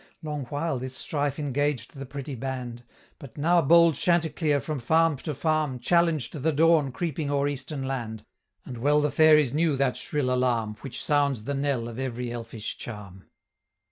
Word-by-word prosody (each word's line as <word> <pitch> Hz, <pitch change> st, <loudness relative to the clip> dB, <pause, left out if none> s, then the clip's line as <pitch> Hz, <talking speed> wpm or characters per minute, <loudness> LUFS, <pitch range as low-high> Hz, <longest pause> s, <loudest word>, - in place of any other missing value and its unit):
Long 150 Hz, -3 st, -4 dB
while 145 Hz, +1 st, -2 dB
this 130 Hz, +1 st, -5 dB
strife 145 Hz, -2 st, -2 dB
engaged 145 Hz, -2 st, -1 dB
the 135 Hz, -1 st, -7 dB
pretty 140 Hz, +2 st, -6 dB
band; 125 Hz, -2 st, -5 dB, 0.4 s
But 135 Hz, -5 st, -12 dB
now 170 Hz, +4 st, +3 dB
bold 170 Hz, +2 st, +6 dB
Chanticleer, 160 Hz, -3 st, +1 dB
from 150 Hz, 0 st, -4 dB
farm 160 Hz, +4 st, +2 dB
to 150 Hz, +2 st, -5 dB
farm, 155 Hz, -2 st, 0 dB
Challenged 160 Hz, -1 st, +1 dB
the 160 Hz, +4 st, +2 dB
dawn 155 Hz, -2 st, +3 dB
creeping 155 Hz, 0 st, -3 dB
o'er 140 Hz, 0 st, +1 dB
eastern 140 Hz, 0 st, -4 dB
land, 120 Hz, -5 st, -4 dB, 0.4 s
And 125 Hz, -2 st, -7 dB
well 145 Hz, +4 st, +3 dB
the 150 Hz, -1 st, +1 dB
fairies 150 Hz, -3 st, +5 dB
knew 155 Hz, -1 st, +2 dB
that 135 Hz, -2 st, +1 dB
shrill 135 Hz, -4 st, -1 dB
alarm, 120 Hz, -4 st, 0 dB
Which 135 Hz, -2 st, -5 dB
sounds 140 Hz, -6 st, +1 dB
the 140 Hz, -, -3 dB
knell 135 Hz, -4 st, -1 dB
of 120 Hz, +1 st, -7 dB
every 125 Hz, -2 st, -3 dB
elfish 115 Hz, -2 st, -6 dB
charm. 100 Hz, -4 st, -9 dB
140 Hz, 170 wpm, -26 LUFS, 125-155 Hz, 0.4 s, bold